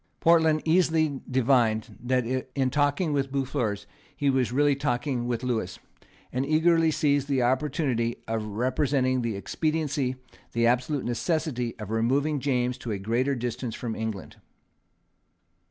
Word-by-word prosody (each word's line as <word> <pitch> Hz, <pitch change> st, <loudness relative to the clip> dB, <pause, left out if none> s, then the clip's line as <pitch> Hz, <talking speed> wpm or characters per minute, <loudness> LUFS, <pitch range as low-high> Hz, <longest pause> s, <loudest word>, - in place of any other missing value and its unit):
Portland 160 Hz, -2 st, +4 dB
easily 160 Hz, -4 st, +2 dB
divined 120 Hz, -4 st, +2 dB
that 125 Hz, 0 st, +1 dB, 0.3 s
in 130 Hz, -2 st, +1 dB
talking 145 Hz, +3 st, +1 dB
with 135 Hz, -1 st, -1 dB
Boufflers 130 Hz, -6 st, -2 dB, 0.3 s
he 140 Hz, -1 st, +2 dB
was 130 Hz, -3 st, +1 dB
really 145 Hz, +2 st, +3 dB
talking 125 Hz, -2 st, -1 dB
with 120 Hz, 0 st, -2 dB
Lewis, 110 Hz, -8 st, -2 dB, 0.6 s
and 130 Hz, +2 st, 0 dB
eagerly 160 Hz, +2 st, +3 dB
seized 145 Hz, -3 st, +1 dB
the 135 Hz, -3 st, +1 dB
opportunity 130 Hz, -2 st, 0 dB
of 110 Hz, -1 st, -1 dB
representing 130 Hz, +4 st, 0 dB
the 115 Hz, -3 st, -2 dB
expediency, 145 Hz, +3 st, -1 dB, 0.4 s
the 115 Hz, 0 st, +2 dB
absolute 130 Hz, +4 st, +1 dB
necessity, 125 Hz, -1 st, -1 dB
of 105 Hz, -1 st, -7 dB
removing 135 Hz, +7 st, +1 dB
James 125 Hz, -2 st, 0 dB
to 115 Hz, -, -5 dB
a 105 Hz, -, -1 dB
greater 120 Hz, +8 st, 0 dB
distance 120 Hz, -1 st, -4 dB
from 115 Hz, -3 st, -4 dB
England. 110 Hz, -4 st, -5 dB
130 Hz, 135 wpm, -26 LUFS, 120-145 Hz, 0.6 s, Portland